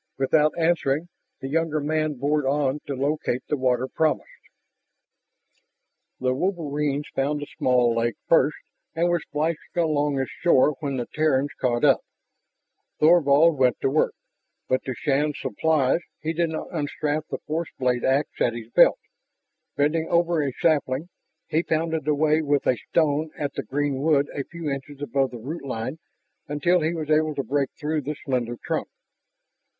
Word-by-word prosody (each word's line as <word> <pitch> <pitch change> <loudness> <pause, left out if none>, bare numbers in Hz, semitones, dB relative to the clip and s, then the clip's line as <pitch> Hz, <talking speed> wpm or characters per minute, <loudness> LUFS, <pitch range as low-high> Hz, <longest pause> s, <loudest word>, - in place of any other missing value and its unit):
Without 150 +3 +3
answering, 165 -1 +1 0.3
the 135 - -4
younger 155 +1 0
man 155 0 -1
bored 145 +3 0
on 140 0 +1
to 140 - -3
locate 140 -2 -1
the - - 0
water 130 -1 +1
promised. 155 +3 0 1.9
The 130 0 +1
wolverines 150 -3 -1
found 145 +2 0
the - - -4
small 125 -2 +3
lake 115 0 0
first 155 -2 +4 0.4
and 170 +2 +2
were 175 0 +2
splashing 155 +1 -2 0.2
along 150 -4 +1
its 135 - -2
shore 150 -3 +3
when 140 -4 -3
the 120 - -2
Terrans 145 -2 +1
caught 120 0 0
up. 135 -3 +5 1.0
Thorvald 155 -1 +5
went 125 -2 +3
to 135 - +1
work, 155 - +1 0.5
but 130 - +1
to 130 - -3
Shann's 145 +2 0
surprise 150 +4 +1 0.2
he 160 +2 -2
did 170 0 0
not 160 - -5
unstrap 150 0 -2
the - - -4
force 160 +2 -4
blade 125 -2 0
ax 135 +3 +2
at 120 - +3
his 115 0 -8
belt. - - +6 0.8
Bending 160 +3 +1
over 170 -1 +2
a 140 -2 -1
sapling, 150 +1 0 0.4
he 160 - +1
pounded 160 -2 -1
away 155 +1 +3
with 145 -2 +1
a 125 - +3
stone 155 -1 +2
at 145 -4 -3
the - - -3
green 140 -1 -2
wood 145 -2 +2
a 140 - -3
few 170 -2 -7
inches 140 0 -5
above 140 -2 0
the 120 - -8
root 145 +9 -6
line 130 +3 -4 0.5
until 165 +5 +2
he 155 +1 +1
was 155 -2 -3
able 155 0 +2
to 140 - -1
break 140 0 0
through 155 0 -1
the 150 +2 -4
slender 120 -3 -1
trunk. - - -1
145 Hz, 160 wpm, -24 LUFS, 135-155 Hz, 1.9 s, belt